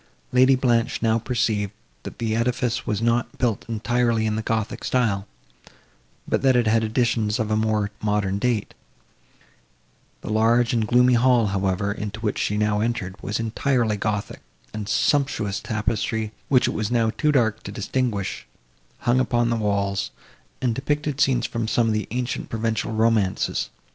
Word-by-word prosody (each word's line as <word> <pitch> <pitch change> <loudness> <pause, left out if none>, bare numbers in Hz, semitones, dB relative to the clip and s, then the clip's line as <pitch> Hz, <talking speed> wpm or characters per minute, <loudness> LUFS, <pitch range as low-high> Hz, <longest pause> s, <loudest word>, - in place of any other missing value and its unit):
Lady 130 +1 +5
Blanche 120 -3 +1
now 115 0 +3
perceived, 110 -4 -1 0.3
that - - -9
the 110 -2 -1
edifice 120 0 -1
was 110 +1 -1
not 115 0 0
built 115 -4 -1
entirely 115 0 +1
in 105 -1 0
the 110 - -1
gothic 110 -1 -2
style, 105 -6 0 1.0
but - - 0
that 135 -1 +4
it 120 -1 +3
had 110 +1 +3
additions 110 -1 +1
of 110 -2 -2
a - - +3
more 110 -2 0
modern 105 -2 0
date; 120 -2 -1 1.5
the - - -7
large 115 +2 +3
and 110 -2 +1
gloomy 125 +2 +4
hall, 120 -1 +4
however, 95 0 0
into 105 +1 -5
which 105 -2 -1
she 105 - 0
now 105 0 +1
entered, 110 -5 -2
was 105 - -2
entirely 115 0 0
gothic, 105 0 -3 0.3
and 105 -1 -5
sumptuous 135 -9 +1
tapestry, 110 0 -2 0.2
which 130 -2 +4
it - - -1
was 110 -1 -2
now 115 -2 +2
too 150 +6 +1
dark 115 -6 +1
to - - -7
distinguish, 105 -1 -2 0.5
hung 120 +2 +2
upon 120 -2 +1
the - - +2
walls, 100 -2 -1 0.5
and 120 -2 +2
depictured 145 +2 -2
scenes 125 -3 +3
from 115 -1 -3
some 115 +1 +2
of - - +1
the 105 -1 -2
ancient 125 +2 -3
Provençal 110 -1 -2
romances. 110 -4 +1
115 Hz, 160 wpm, -23 LUFS, 105-120 Hz, 1.5 s, Lady